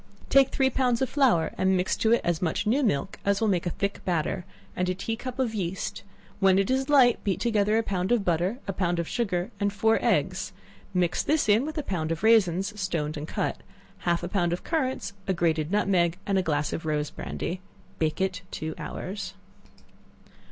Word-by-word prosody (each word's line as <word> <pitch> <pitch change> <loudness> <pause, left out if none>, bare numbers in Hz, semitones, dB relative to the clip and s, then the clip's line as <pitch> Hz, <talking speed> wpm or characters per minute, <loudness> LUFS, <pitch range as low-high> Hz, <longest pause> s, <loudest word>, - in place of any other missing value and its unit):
Take 275 -1 +6
three 265 -1 +1
pounds 250 -2 +1
of 255 - -2
flour, 245 - +3
and 190 0 +3
mix 180 +1 0
to 220 - +2
it 235 - +4
as 170 -1 0
much 180 +3 0
new 245 +7 +2
milk 195 - 0
as 200 0 +2
will 225 - +1
make 180 -3 +1
a - - +2
thick 200 +3 -3
batter, 175 0 -1 0.3
and 180 0 0
a 185 - 0
tea 225 +4 -3
cup 255 +2 -7
of 250 -4 0
yeast; 190 -3 -3 0.4
when 190 -1 +5
it 195 +4 +2
is 265 +2 0
light, 260 -5 +5
beat 195 -3 0
together 215 -2 +2
a 225 - +2
pound 190 -1 -1
of 230 -5 +2
butter, 175 +6 +1
a 195 - -1
pound 175 -2 0
of 170 -1 -2
sugar, 185 -6 -1
and 205 0 +1
four 220 +2 +2
eggs; - - 0 0.4
mix 180 -3 +1
this 305 -5 +1
in 220 +7 +4
with 315 - -6
a 300 - -1
pound 165 -8 -2
of 165 +3 -3
raisins, 205 -3 +3
stoned 160 -4 -2
and 150 +1 -5
cut, - - -2 0.4
half 170 0 0
a - - -2
pound 175 -2 0
of 175 - -4
currants, 260 -10 -1
a 190 - +1
grated 160 -3 +1
nutmeg, 180 -5 +2
and 195 -1 +2
a - - +2
glass 150 -4 -1
of - - -4
rose 150 -1 -1
brandy; 180 +2 -5 0.4
bake 155 -1 0
it 190 -1 -1
two 160 0 -4
hours. 195 +2 -5
190 Hz, 210 wpm, -27 LUFS, 175-225 Hz, 0.4 s, Take